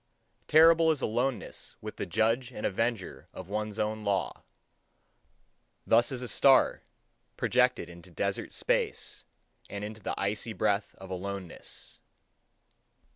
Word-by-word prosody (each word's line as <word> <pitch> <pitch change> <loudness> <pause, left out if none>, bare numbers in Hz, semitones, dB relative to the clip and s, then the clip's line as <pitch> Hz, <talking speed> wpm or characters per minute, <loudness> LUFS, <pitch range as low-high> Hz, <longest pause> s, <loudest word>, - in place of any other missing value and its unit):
Terrible 165 +1 +6
is 155 -4 +1
aloneness 125 +3 -2
with 110 0 -8
the - - -3
judge 115 +8 +1
and 105 - -5
avenger 100 - -2
of 95 0 -8
one's 105 0 -3
own 110 0 -1
law. 100 -2 -1 1.4
Thus 120 +3 +4
is 125 -1 -4
a - - -4
star 135 +2 +4 0.6
projected 125 -6 +2
into 85 +1 -13
desert 85 - -2
space, - - -1 0.4
and 100 0 -5
into 110 +1 -7
the - - -3
icy 105 +3 -1
breath 105 -1 0
of 95 0 -11
aloneness. 95 -1 -5
110 Hz, 125 wpm, -29 LUFS, 100-125 Hz, 1.4 s, Terrible